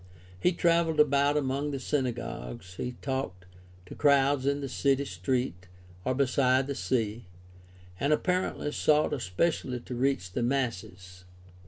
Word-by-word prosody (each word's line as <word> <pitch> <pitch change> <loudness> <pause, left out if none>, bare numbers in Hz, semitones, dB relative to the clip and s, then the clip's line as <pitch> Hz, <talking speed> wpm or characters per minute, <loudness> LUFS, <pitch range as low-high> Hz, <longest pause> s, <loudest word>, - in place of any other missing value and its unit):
He 180 - +3
traveled 170 -2 +2
about 145 0 +4
among 140 +1 -1
the 140 -2 -3
synagogues, 115 - -3
he 125 - -3
talked 130 -10 -3 0.4
to - - -10
crowds 140 -1 +3
in 140 0 +1
the 140 - -4
city 140 +1 +1
street 90 -1 -2 0.4
or 130 - 0
beside 130 0 +3
the 140 - -3
sea, 115 -4 -1 0.7
and 140 - +1
apparently 180 -2 0
sought 150 0 +2
espe 120 - +1
cially 125 -5 -6
to 125 - -6
reach 125 -7 0
the 120 - -2
masses. 95 -8 -3
130 Hz, 140 wpm, -29 LUFS, 115-140 Hz, 0.7 s, about